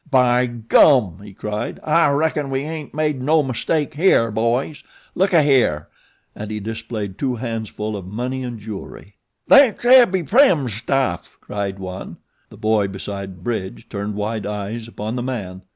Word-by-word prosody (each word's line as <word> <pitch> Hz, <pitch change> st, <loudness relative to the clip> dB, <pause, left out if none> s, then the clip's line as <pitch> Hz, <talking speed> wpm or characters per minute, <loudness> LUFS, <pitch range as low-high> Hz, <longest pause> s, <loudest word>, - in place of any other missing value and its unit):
"By 125 Hz, -2 st, +3 dB
gum!" 115 Hz, -, +3 dB
he 105 Hz, -, -11 dB
cried, 105 Hz, +2 st, -5 dB
"I 155 Hz, 0 st, +3 dB
reckon 150 Hz, 0 st, 0 dB
we 135 Hz, 0 st, -1 dB
ain't 155 Hz, 0 st, -6 dB
made 150 Hz, -3 st, -1 dB
no 155 Hz, +3 st, +3 dB
mistake 145 Hz, +4 st, -1 dB
here, 145 Hz, -, +3 dB
boys. 120 Hz, +7 st, -1 dB, 0.3 s
Look 190 Hz, +2 st, +1 dB
ahere!" 135 Hz, -, +3 dB, 0.5 s
and 105 Hz, 0 st, -7 dB
he 105 Hz, 0 st, -4 dB
displayed 110 Hz, -2 st, -6 dB
two 130 Hz, -3 st, -1 dB
handsful 110 Hz, -2 st, -4 dB
of 95 Hz, -3 st, -7 dB
money 125 Hz, +6 st, -4 dB
and 120 Hz, -2 st, -5 dB
jewelry. 105 Hz, -1 st, -9 dB, 0.3 s
"Thet's 275 Hz, -5 st, +5 dB
Abbie 240 Hz, -8 st, +6 dB
Prim's 165 Hz, -, +3 dB
stuff," 130 Hz, +5 st, -2 dB
cried 100 Hz, -1 st, -4 dB
one. 95 Hz, -1 st, -7 dB, 0.3 s
The -, -, -14 dB
boy 110 Hz, -2 st, +1 dB
beside 95 Hz, -2 st, -7 dB
Bridge 110 Hz, 0 st, -4 dB
turned 100 Hz, 0 st, -4 dB
wide 105 Hz, +1 st, -3 dB
eyes 105 Hz, +2 st, -5 dB
upon 110 Hz, 0 st, -5 dB
the 125 Hz, -, -2 dB
man. 100 Hz, -8 st, -5 dB
115 Hz, 150 wpm, -20 LUFS, 105-140 Hz, 0.5 s, Abbie